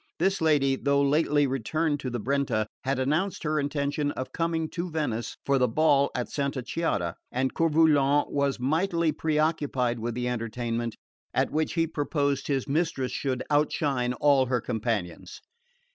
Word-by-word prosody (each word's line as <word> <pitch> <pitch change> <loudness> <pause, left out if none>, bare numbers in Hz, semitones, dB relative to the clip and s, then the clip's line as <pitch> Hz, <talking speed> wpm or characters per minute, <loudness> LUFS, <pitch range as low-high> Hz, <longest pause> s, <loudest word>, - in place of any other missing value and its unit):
This 190 +2 +1
lady, 145 -4 +3
though 140 +1 +2
lately 145 0 +3
returned 145 +4 -1
to 130 - -4
the 120 0 -3
Brenta, 125 -3 0 0.2
had 135 +1 0
announced 155 +9 0
her 155 0 0
intention 145 0 -1
of 130 - -5
coming 165 -1 -1
to 175 +1 -3
Venice 145 -8 -3
for 140 -1 +2
the 125 - +3
ball 140 +2 +3
at 125 - -2
Santa 140 -3 -2
Chiara; 120 - -2
and 130 +1 -1
Coeur 165 0 +2
Volant 145 -2 +3
was 140 -2 0
mightily 165 +5 +1
preoccupied 150 -6 0
with 115 +1 -3
the 125 0 -2
entertainment, 115 -1 -3 0.4
at - - +1
which 155 +1 0
he 165 -1 +2
purposed 145 -3 -1
his 135 -2 -1
mistress 140 -3 0
should 130 -3 -2
outshine 145 -4 +1
all 135 0 +3
her 125 -1 +1
companions. 110 -7 -3
140 Hz, 160 wpm, -27 LUFS, 125-155 Hz, 0.4 s, lady